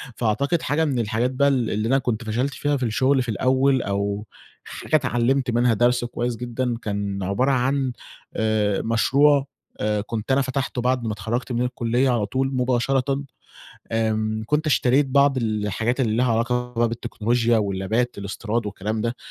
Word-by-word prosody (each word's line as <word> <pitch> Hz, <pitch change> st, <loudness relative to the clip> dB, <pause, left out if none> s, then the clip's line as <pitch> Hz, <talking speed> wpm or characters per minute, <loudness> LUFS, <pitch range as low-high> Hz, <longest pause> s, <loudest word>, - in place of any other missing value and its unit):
فأعتقد 140 Hz, +9 st, 0 dB
حاجة 155 Hz, +3 st, +1 dB
من 135 Hz, -5 st, 0 dB
الحاجات 115 Hz, +3 st, 0 dB
بقى 140 Hz, +2 st, +2 dB
ال 130 Hz, -5 st, +1 dB
اللي 110 Hz, +2 st, -1 dB
أنا 135 Hz, -, +3 dB
كنت 120 Hz, -3 st, -2 dB
فشَلت 125 Hz, +6 st, -1 dB
فيها 145 Hz, -1 st, 0 dB
في 130 Hz, -, -4 dB
الشغل 130 Hz, +4 st, +2 dB
في 125 Hz, -, -6 dB
الأول 130 Hz, +4 st, +2 dB
أو 100 Hz, +1 st, -2 dB, 0.4 s
حاجة -, -, -3 dB
اتعلّمت 125 Hz, -1 st, +1 dB
منها 120 Hz, 0 st, +3 dB
درس 120 Hz, +2 st, +2 dB
كويس 120 Hz, 0 st, -3 dB
جدًا 120 Hz, 0 st, -3 dB
كان 100 Hz, -2 st, -3 dB
عبارة 100 Hz, +9 st, +1 dB
عن 130 Hz, +1 st, +1 dB, 0.4 s
آآ، 110 Hz, -2 st, +1 dB
مشروع 135 Hz, +5 st, +3 dB, 0.3 s
آآ 105 Hz, 0 st, 0 dB
كنت 115 Hz, +3 st, -4 dB
أنا 135 Hz, -, +4 dB
فتَحته 130 Hz, -1 st, -2 dB
بَعد 125 Hz, 0 st, +1 dB
ما 110 Hz, -, -1 dB
اتخرّجت 120 Hz, +5 st, -3 dB
من 120 Hz, 0 st, 0 dB
الكُلية 125 Hz, +1 st, 0 dB
على 115 Hz, -4 st, +1 dB
طول 135 Hz, +5 st, -1 dB
مباشرةً، 130 Hz, +2 st, 0 dB, 0.7 s
آمم، 110 Hz, -1 st, 0 dB
كنت 150 Hz, +3 st, 0 dB
اشتريت 135 Hz, -1 st, +3 dB
بعض 140 Hz, 0 st, +3 dB
الحاجات 110 Hz, +2 st, -1 dB
اللي 110 Hz, -4 st, +1 dB
ليها 125 Hz, 0 st, +2 dB
علاقة 125 Hz, +1 st, 0 dB
بالتكنولوجيا 115 Hz, 0 st, 0 dB
واللابات 100 Hz, +4 st, -1 dB
الإستيراد 105 Hz, +3 st, -3 dB
والكلام 105 Hz, +2 st, -3 dB
ده، 115 Hz, +2 st, -2 dB
120 Hz, 160 wpm, -23 LUFS, 110-130 Hz, 0.7 s, أنا